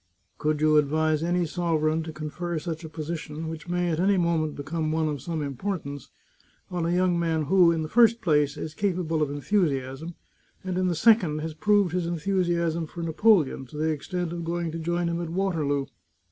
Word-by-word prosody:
" - - -45
Could 150 0 0
you 155 0 +5
advise 155 +1 +2
any 175 +1 +1
sovereign 160 -2 0
to 160 0 -6
confer 160 +3 -4
such 160 +1 -4
a 160 - -7
posi 160 +1 -4
tion, 155 +2 -6
which 160 +2 -7
may 175 0 0
at 160 - -1
any 195 +2 +3
moment 165 -3 +1
become 155 +2 -3
one 160 0 +1
of 145 -3 -3
some 160 0 -3
im 140 -1 -4
portance, 145 -4 -4 0.6
on 175 -2 -1
a - - 0
young 180 -1 +2
man 165 -2 0
who, 175 +3 +5
in 165 -1 -1
the - - -3
first 230 +4 +5
place, 150 -7 +2
is 155 +1 -5
capable 175 -4 -1
of 150 - +1
enthusiasm, 145 -1 -1 0.5
and, 185 -1 -2
in 185 - +1
the 175 - 0
second, 185 -5 +4
has 160 0 -4
proved 205 +1 +2
his 180 -2 0
enthusi 175 +1 0
asm 170 -1 -1
for 170 - -6
Napoleon 165 - +2
to 150 - -10
the 160 +1 +1
extent 170 +3 -3
of 170 -1 -4
going 170 0 -2
to 165 - -5
join 170 +1 -1
him 170 0 -1
at 170 - -4
Waterloo? 160 -6 0
165 Hz, 210 wpm, -26 LUFS, 155-175 Hz, 0.6 s, you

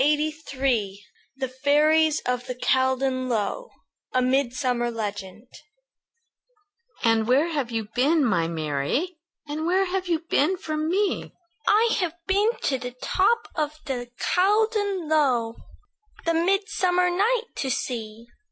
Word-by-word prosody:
UNKNOWN 275 -8 0 0.4
THE 265 - -2
FAIRIES 300 +4 +3
OF 250 0 -2
THE 250 - -4
CALDON 260 0 +1
LOW 240 - -2 0.4
A 255 - +3
MIDSUMMER 250 -2 +1
LEGEND 205 -2 -5 1.6
"And 225 -2 +3
where 280 +7 +3
have 285 -7 -2
you 225 -3 -3
been, 290 +4 +3
my 170 -8 +1
Mary, 165 - -2 0.3
And 310 +2 -3
where 375 +2 +3
have 375 0 -2
you 335 -1 0
been 360 +7 +2
from 310 -3 -3
me?" 395 +3 0 0.3
"I've 420 -5 +3
been 400 +3 +3
to 265 -2 0
the 245 0 -7
top 430 +5 +2
of 305 -1 -2
the 245 -3 -4
Caldon 405 -2 +1
Low, 255 -7 +1 0.7
The 335 - +2
midsummer 360 0 +2
night 440 +6 +1
to 270 - -2
see." 230 -3 -4
285 Hz, 125 wpm, -25 LUFS, 245-360 Hz, 1.6 s, FAIRIES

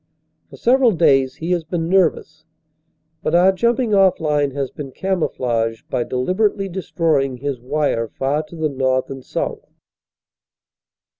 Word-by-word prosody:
For - - -13
several 250 -1 +3
days 135 -6 +3
he 165 +2 -4
has 175 -2 +1
been 165 0 -3
nervous. 165 -4 +1 0.8
But 160 - 0
our 180 +2 +6
jumping 235 +3 0
off 195 -2 +4
line 150 -2 +1
has 135 -1 -4
been 140 -3 -8
camouflaged 120 - -2
by 120 - 0
deliberately 195 +9 0
destroying 160 -7 -1
his 140 -1 -4
wire 125 -2 -1
far 135 +7 -1
to 170 - -12
the 160 -1 0
north 130 -1 0
and 135 -1 -7
south. - - -4
155 Hz, 140 wpm, -20 LUFS, 135-185 Hz, 0.8 s, our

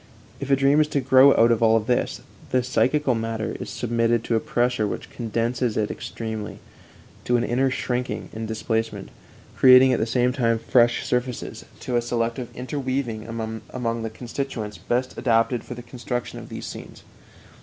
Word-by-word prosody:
If 140 - -5
a 135 - +5
dream 140 +3 +4
is 150 - +2
to 145 - 0
grow 130 +1 +6
out 115 +1 +5
of 115 - +1
all 115 0 +5
this, 120 +3 -1 0.3
the 125 -1 +2
psychical 130 +2 +2
matter 115 -1 -3
is - - -6
submitted 115 -1 0
to 115 - 0
a - - +3
pressure 120 -2 0
which - - -6
condenses 115 +1 -1
it 105 -1 0
extremely, 110 -3 -6 0.7
to 120 - +3
an 120 - 0
inner 130 +3 +1
shrinking 125 -1 -3
and 110 0 -5
displacement, 110 +1 -2 0.5
creating 130 0 +7
at - - +1
the 110 - 0
same 125 +2 +1
time 115 -3 +1
fresh 120 +1 +2
surfaces, 125 -1 -3 0.2
to 125 - -1
a - - +2
selective 120 +1 -2
interweaving 130 -3 -3
among 115 +1 -4
the 110 - -3
constituents 115 -2 -5
best 125 +2 -1
adapted 115 -1 +2
for 125 - -8
the 120 - -9
construction 120 0 -5
of - - -11
these - - -7
scenes. - - -9
120 Hz, 170 wpm, -24 LUFS, 115-125 Hz, 0.7 s, creating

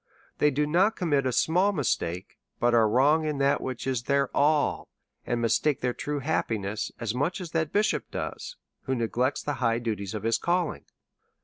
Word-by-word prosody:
They 150 - +5
do 150 +1 0
not 180 +8 +2
commit 145 -6 +1
a - - +1
small 180 +10 +2
mis 145 -9 +1
take, 90 +2 -7 0.2
but 120 +1 +2
are 115 -2 +4
wrong 145 +7 +4
in 150 -2 -2
that 140 0 +2
which 130 -2 -5
is 130 -3 -1
their 140 +1 0
all, 150 +1 +2 0.4
and 120 - 0
mis 115 - +3
take 150 -4 0
their 125 -1 0
true 145 +2 -4
happiness 110 -8 -2
as 115 -2 -2
much 145 +10 -1
as 175 -4 -7
that 160 -3 -1
bishop 210 +1 +1 0.8
who 130 - 0
neglects 125 +3 -1
the 145 - -2
high 115 -2 +2
duties 110 -4 -3
of 105 - -5
his 115 0 +1
calling. 175 -2 -1
135 Hz, 190 wpm, -27 LUFS, 115-155 Hz, 0.8 s, They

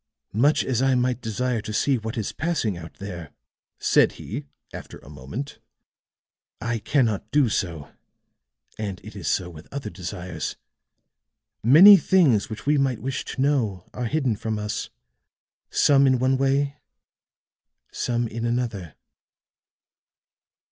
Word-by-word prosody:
"Much 140 +9 +3
as 130 -2 0
I 135 -1 +3
might 125 0 0
desire 120 +1 -1
to 110 - -6
see 130 +4 +1
what 110 +1 -5
is 110 - -2
passing 150 - -1
out 85 -1 -10
there," 90 -6 -7 0.5
said - - +3
he, - - -7 0.3
after - - -9
a 70 - -15
moment, 75 - -7 1.0
"I 115 0 -2
cannot 110 -3 0
do 140 -3 +3
so. 85 -8 -3 0.9
And 100 -3 -4
it - - -11
is - - -6
so 90 - 0
with 80 -2 -13
other 135 -7 -5
desires. 90 -3 -5 1.1
Many 175 - +9
things 150 - +3
which 110 - -7
we 145 0 +3
might 135 -4 +1
wish 130 0 -3
to - - -4
know 115 -11 0
are 125 - -3
hidden 130 -2 0
from 110 +1 -3
us, 105 0 -4 0.8
some 140 -1 +4
in 130 -1 +4
one 130 +2 +2
way, 140 +2 +1 1.1
some 120 -1 -1
in 115 +1 -5
another." 115 -9 -2
120 Hz, 135 wpm, -24 LUFS, 100-135 Hz, 1.1 s, Many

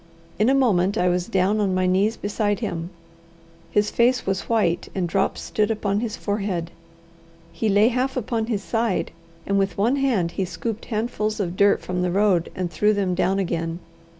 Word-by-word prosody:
In 215 +4 +4
a 270 - +4
moment 205 -6 +2
I 180 - +2
was 175 0 0
down 195 0 +1
on 195 -3 +1
my 185 0 +1
knees 195 +5 +2
beside 205 0 -1
him. 175 -7 -4 0.8
His 210 0 +1
face 245 +1 +2
was 195 0 -2
white, 190 -7 +1
and 185 -3 0
drops 190 +3 0
stood 210 -1 0
upon 205 -2 0
his 225 -1 -3
forehead. 195 -5 -2 0.8
He 220 - -1
lay 205 +3 +5
half 255 +2 -1
upon 225 -2 -1
his 210 -5 -2
side, 225 -3 -1 0.3
and 200 0 +1
with 195 -3 -1
one 235 +7 +2
hand 230 -12 +1
he 190 - -2
scooped 210 +5 -5
handfuls 215 -1 -2
of 180 -3 -2
dirt 200 +1 +4
from 180 0 -2
the 180 - +1
road 190 -2 +2
and 180 -2 -3
threw 210 +6 +2
them 195 -3 0
down 190 +2 +1
again. 165 -3 -2
200 Hz, 185 wpm, -23 LUFS, 185-220 Hz, 0.8 s, lay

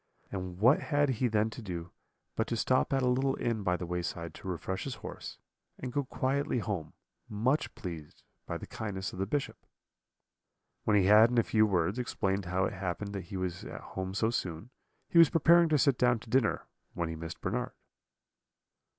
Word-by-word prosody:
And 90 -2 -5
what 120 +9 +5
had 145 -1 +1
he 125 0 +1
then 110 -1 +1
to 120 - -8
do 85 -4 -6 0.4
but 115 - 0
to 115 - -1
stop 130 +3 +2
at 135 -1 +2
a - - +3
little 135 +2 +2
inn 115 -2 -1
by 90 -2 +1
the 90 - -5
wayside 85 -1 -4
to - - -10
refresh 95 +1 -3
his 135 -3 -4
horse, - - -7 0.4
and 125 -1 -6
go 145 -1 0
quietly 135 +1 0
home, 95 -8 -3 0.4
much 125 +8 0
pleased 85 -7 -8 0.2
by - - -3
the - - -8
kindness 95 -3 -5
of 90 - -8
the 95 - 0
Bishop? 145 +5 -3 1.2
"When 105 -1 +4
he 100 - +4
had, 105 +3 +7
in 125 - -1
a 115 - +5
few 110 0 +3
words, 95 +3 +1
explained 100 -5 -1
how 90 +2 +1
it - - -2
happened 95 +2 -4
that 100 -2 -5
he 100 - -6
was 90 -2 -3
at - - -7
home 95 0 -4
so 110 +3 +2
soon, 90 +1 -4 0.4
he 170 - +4
was 165 -4 +8
preparing 170 +1 +5
to 155 - +4
sit 140 -2 +3
down 125 -1 +4
to 110 - -13
dinner, 130 -4 +2 0.3
when 85 -1 -1
he 80 - -4
missed 80 +1 -7
Bernard. 120 +6 -2
105 Hz, 200 wpm, -31 LUFS, 90-125 Hz, 1.2 s, was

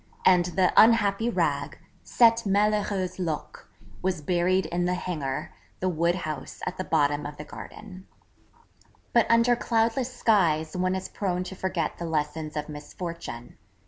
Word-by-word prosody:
And 180 -2 +6
the 180 +1 +1
'Unhappy 225 -1 +5
rag' - - -1 0.3
'cette 230 -1 +4
malheureuse 200 -2 +1
loque,' 165 -4 -4 0.3
was 185 -3 -1
buried 180 +3 +1
in 175 +2 -1
the 180 0 +1
hangar, 155 -7 -4 0.3
the 185 - 0
wood 170 0 +1
house 155 -5 -6
at 185 - -4
the - - 0
bottom 145 -3 +1
of 145 0 -9
the 150 - -6
garden. 190 +1 -11 1.1
But 235 -2 +4
under 230 +1 +5
cloudless 235 +2 0
skies 170 -10 +2
one 185 +1 0
is 190 - -4
prone 180 -3 -2
to 190 - -8
forget 185 -4 -2
the 170 - -4
lessons 155 -1 -2
of 150 - -3
misfortune. 150 -4 -7
180 Hz, 145 wpm, -26 LUFS, 160-200 Hz, 1.1 s, And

